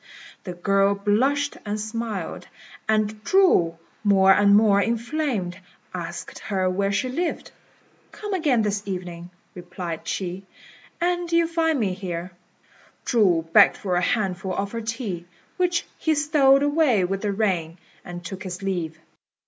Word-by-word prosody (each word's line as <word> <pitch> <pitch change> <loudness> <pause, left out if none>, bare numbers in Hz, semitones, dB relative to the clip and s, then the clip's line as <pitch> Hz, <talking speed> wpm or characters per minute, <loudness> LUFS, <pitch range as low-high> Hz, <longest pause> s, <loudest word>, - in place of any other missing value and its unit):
The 180 - -5
girl 195 +2 +2
blushed 260 +9 +1
and 210 0 -3
smiled; 215 -4 -4 0.4
and 215 0 0
Chu, 225 - +3 0.3
more 195 -2 +5
and 200 0 +5
more 205 -1 +5
inflamed, 235 - -2 0.3
asked 170 -1 -6
her 190 -3 -1
where 195 +2 0
she 200 +6 0
lived. 325 +7 -3 0.6
"Come 415 -1 -6
again 290 -11 +2
this 205 -1 -1
evening," 175 -2 -5 0.2
replied 175 -2 -7
she, 190 +1 -4 0.5
"and 350 0 -1
you'll 335 0 +3
find 325 -3 +1
me 200 -5 0
here." 180 -1 -5 0.7
Chu 180 -9 +2
begged - - +7
for 185 -3 -2
a 175 - +2
handful 190 -3 -1
of 200 0 -2
her 230 - -4
tea, 220 -6 -4 0.3
which 355 -1 +1
he 315 -1 +1
stowed 285 -2 +4
away 290 - +3
with 195 +2 -2
the 210 - -1
ring, 185 -5 -1 0.3
and 175 0 -8
took 190 +2 -6
his 185 0 -6
leave. 175 -5 -2
200 Hz, 140 wpm, -24 LUFS, 185-255 Hz, 0.7 s, begged